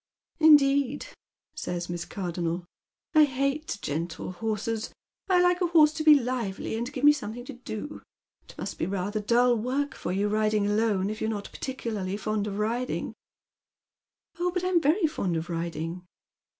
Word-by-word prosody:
"Indeed," 285 - +5 0.5
says 175 0 -4
Miss 175 0 -4
Cardonnel. 175 -2 -3 0.5
"I 310 -1 +7
hate 275 0 -1
gentle 165 +4 -3
horses. 220 +3 -3 0.4
1 360 -2 +4
like 355 +1 +3
a 355 - +3
horse 310 -3 +5
to 310 - -3
be 305 -2 +8
lively, 235 -5 -3
and 235 +4 -3
give 265 -2 -6
me 295 - +9
something 245 -4 -5
to 280 - -7
do. 240 +3 -7 0.5
It - - -13
must - - -5
be - - 0
rather 200 +2 -2
dull 240 +3 +3
work 260 +6 -1
for - - -4
you 200 +3 +1
riding 215 0 +1
alone, 205 -2 +1
if 215 - -7
you're 220 - 0
not 205 -2 -4
particulai 230 -6 -4
ly 185 +2 -2
fond 215 -1 -2
of 200 -1 -4
riding." 235 +4 -2 0.6
" - - -37
Oil, 360 - +2
but 360 0 -2
I'm 365 -2 +2
very 320 +6 +3
fond 195 - -1
of 165 +2 -4
riding." 165 +1 -4
225 Hz, 170 wpm, -27 LUFS, 195-285 Hz, 0.6 s, me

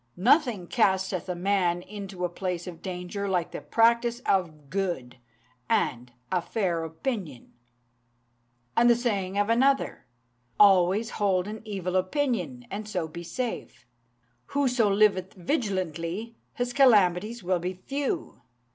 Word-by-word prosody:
Nothing 235 - +3
casteth 190 -4 +1
a 180 - -1
man 180 -1 +1
into 195 -3 -5
a - - -1
place 180 -1 -4
of 175 -3 -9
danger 185 +2 -4
like 175 -2 0
the - - -6
practice 235 +1 +2
of 160 - -1
good, 175 -11 -2 0.5
and 120 0 0 0.2
a 180 -1 +2
fair 175 -5 -1
opinion!' 160 - -5 1.2
"And 240 +1 +5
the 235 - +6
saying 200 -5 -1
of 205 0 +2
another 260 - +2 0.5
"'Always 195 +3 +5
hold 195 -3 +1
an 215 +1 -6
evil 190 -4 -3
opinion, 185 - -1
and 210 +2 -5
so 180 -5 -2
be 170 +2 -8
safe. 225 - -5 0.6
Whoso 250 -6 +2
liveth 195 -2 +2
vigilantly, 190 - -2 0.2
his 245 0 -2
calamities 215 -4 +4
will 180 0 +1
be 180 +2 -3
few. 275 +9 -4
190 Hz, 130 wpm, -27 LUFS, 175-225 Hz, 1.2 s, the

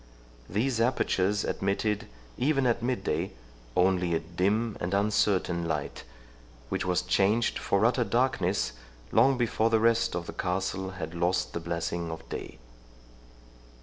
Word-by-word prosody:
These 115 +5 0
apertures 105 -4 +1
admitted, 100 +2 -1 0.3
even 135 0 +1
at 120 -1 +2
mid 125 +1 -1
day, - - -1 0.4
only 90 -2 +2
a - - +1
dim 100 +7 0
and 90 +3 -1
uncertain 100 -4 +1
light, 80 -6 -3 0.6
which - - -1
was 90 0 +1
changed 100 +5 +2
for 100 +2 +2
utter 120 +1 +3
darkness 115 - +1 0.4
long 130 +4 +4
before 115 -2 +1
the 115 -1 +3
rest 115 -3 +2
of 85 -1 -3
the - - -7
castle 95 +1 -2
had 80 -3 -5
lost 85 +2 0
the - - -2
blessing 85 0 -3
of 80 0 -7
day. - - -6
100 Hz, 140 wpm, -28 LUFS, 90-115 Hz, 0.6 s, long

